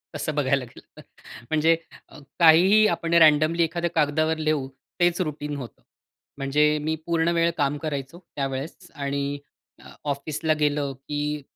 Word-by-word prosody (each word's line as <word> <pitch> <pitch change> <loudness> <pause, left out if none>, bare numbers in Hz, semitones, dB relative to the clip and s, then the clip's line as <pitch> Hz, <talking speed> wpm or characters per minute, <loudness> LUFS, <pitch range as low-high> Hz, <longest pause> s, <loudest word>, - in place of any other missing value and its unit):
तसं 155 - -3
बघायला 135 -2 +1
गेलं 120 - -15 0.2
तर. - - -10 0.5
म्हणजे 160 +1 +3 0.6
काहीही 180 +6 +6
आपण 170 0 -2
रँडमली 160 0 +5
एखाद्या 170 +1 -1
कागदावर 155 +1 +1
लिहु 155 -3 -1 0.3
तेच 175 +1 +2
रुटीन 150 -2 -4
होतं. 125 -4 -9 0.6
म्हणजे 150 +2 +2
मी 160 +1 -1
पूर्ण 170 -1 +1
वेळ 170 0 +3
काम 145 -1 0
करायचो 145 +1 -5 0.2
त्यावेळेस 140 +6 -5
आणि 140 0 -3 0.7
ऑफिसला 150 +2 -1
गेलं, 145 -1 0
की 145 +2 -4
150 Hz, 130 wpm, -24 LUFS, 140-165 Hz, 0.7 s, काहीही